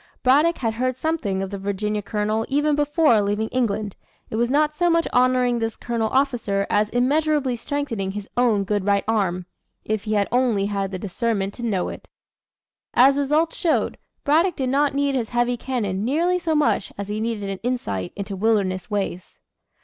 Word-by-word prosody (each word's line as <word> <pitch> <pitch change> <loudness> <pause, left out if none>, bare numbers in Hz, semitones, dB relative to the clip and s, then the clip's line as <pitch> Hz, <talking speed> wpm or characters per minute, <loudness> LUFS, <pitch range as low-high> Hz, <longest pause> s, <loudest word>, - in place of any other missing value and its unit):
Braddock 295 +6 +4
had 225 -3 -1
heard 255 +2 -1
something 250 -10 -1
of 195 - -6
the 200 - -5
Virginia 205 +2 -2
colonel 215 +1 -1
even 295 +2 +2
before 295 -5 +3
leaving 205 +2 -1
England; 215 -5 -1 0.4
and 220 - -2
was 240 0 +1
not 300 +2 +2
so 350 +2 +2
much 335 0 +2
honoring 250 -1 +3
this 225 -1 -2
colonial 230 -2 -2
officer, 240 -7 0
as 210 0 +2
immeasurably 280 +1 +1
strengthening 230 -6 -3
his 205 0 -6
own 235 -5 +3
good 205 0 -1
right 200 -1 +3
arm 190 -5 0 0.4
if 215 0 -2
he 215 - -1
had 205 -1 +2
only 240 -5 +2
had 200 -1 -2
the 185 - -4
discernment 200 +1 -2
to - - -10
know 210 -6 -1
it. - - -10 0.9
As 270 +3 +6
results 300 +4 +1
showed, 330 -3 0 0.2
Braddock 325 +4 +3
did 260 -2 -1
not 280 +1 +2
need 280 0 +1
his 240 -4 -1
heavy 240 0 +1
cannon 215 -6 -2
nearly 335 +9 +1
so 325 -3 -1
much 295 -9 +1
as 200 0 -5
he 210 +1 -3
needed 220 -2 -2
an 195 -1 -4
insight 100 - -2
into 200 0 -5
wilderness 195 -3 0
ways. 195 -3 -4
230 Hz, 180 wpm, -23 LUFS, 205-275 Hz, 0.9 s, As